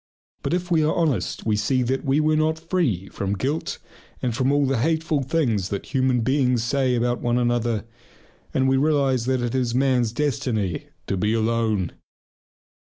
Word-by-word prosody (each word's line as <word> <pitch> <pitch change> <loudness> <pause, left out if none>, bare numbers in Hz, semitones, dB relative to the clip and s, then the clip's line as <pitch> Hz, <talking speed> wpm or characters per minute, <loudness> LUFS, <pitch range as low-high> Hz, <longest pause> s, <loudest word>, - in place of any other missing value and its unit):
But - - 0
if 180 0 -4
we 160 -2 +4
are 155 - +1
honest 150 - -1
we 110 -1 +2
see 125 +5 +1
that 130 +2 -1
we 140 0 +2
were 155 0 +2
not 155 +1 +1
free 160 - -1
from 100 +1 -3
guilt 145 +8 -2 0.4
and 120 -3 -2
from 130 +2 +1
all 145 0 +3
the 135 -3 0
hateful 160 +1 +1
things 120 - 0
that 100 +7 -5
human 130 -2 +2
beings 125 -1 +2
say 130 +1 +1
about 120 +1 0
one 120 0 +1
another, 120 -3 0 0.7
and 130 0 +1
we 135 0 +3
realize 135 -4 +2
that 130 -1 +1
it 120 -1 -2
is 125 -2 0
man's 125 -3 +2
destiny 115 - -1 0.2
to 95 - -2
be 105 +4 +1
alone. 110 -5 0
130 Hz, 175 wpm, -23 LUFS, 115-145 Hz, 0.7 s, we